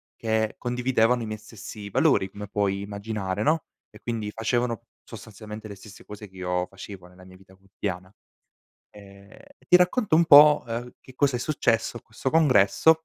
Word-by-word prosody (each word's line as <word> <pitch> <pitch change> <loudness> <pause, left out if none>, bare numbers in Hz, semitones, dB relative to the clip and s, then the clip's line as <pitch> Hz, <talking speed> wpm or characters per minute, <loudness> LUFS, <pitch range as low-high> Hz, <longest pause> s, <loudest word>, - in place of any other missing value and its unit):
che 110 -1 -1
condividevano 125 -1 +1
i - - -4
miei 110 -1 -6
stessi 105 -1 -10
valori, 95 0 +2
come 105 +1 -9
puoi 100 -1 -1
immaginare, 100 -1 -4
no, 155 +6 +1 0.3
e - - -16
quindi 115 -3 -4
facevano 115 +1 -2 0.2
sostanzialmente 110 0 -10
le 100 - -9
stesse 100 +1 -15
cose 105 -1 -10
che 95 - -23
io 90 0 -2
facevo 95 -2 -11
nella 90 +1 -17
mia 95 0 -15
vita 95 0 -20
quotidiana. 95 -1 -7 0.8
Ehm, 100 0 -16 0.3
e - - -29
ti 180 - +8
racconto 180 0 +2
un 170 - +4
po', 150 -1 +8
ehm, 120 +1 -6
che 130 - -16
cosa 135 -2 +1
è - - -3
successo 120 -4 0
a - - -7
questo 110 +4 -5
congresso, 160 +2 +4
110 Hz, 175 wpm, -25 LUFS, 100-125 Hz, 0.8 s, ti